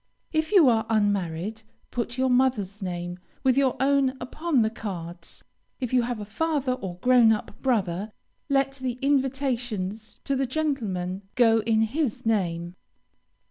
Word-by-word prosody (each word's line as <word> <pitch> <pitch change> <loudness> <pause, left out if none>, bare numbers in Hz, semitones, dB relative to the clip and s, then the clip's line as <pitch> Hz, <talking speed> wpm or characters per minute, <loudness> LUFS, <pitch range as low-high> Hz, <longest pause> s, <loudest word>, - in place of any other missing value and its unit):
If 315 +2 0
you 370 -9 +7
are 225 -2 +3
unmarried, 205 -1 0 0.3
put 240 0 -3
your 260 0 +2
mother's 235 -6 +1
name 175 -1 -4 0.2
with 260 -2 +4
your 270 -2 +3
own 270 -1 +2
upon 305 -3 0
the 220 - 0
cards. 175 -6 -7 0.4
If 250 -2 -3
you 250 - +5
have 240 -1 -3
a 205 - -5
father 285 +4 -1
or 190 -8 -6
grown 245 -3 +6
up 210 -1 -3
brother, 205 -5 0 0.4
let 275 -1 +2
the 260 -2 -2
invitations 245 -7 -1
to 275 - 0
the 265 0 0
gentlemen 215 - -2
go 225 -2 +5
in 220 0 +2
his 255 +1 -2
name. 175 -6 0
230 Hz, 145 wpm, -26 LUFS, 200-265 Hz, 0.4 s, you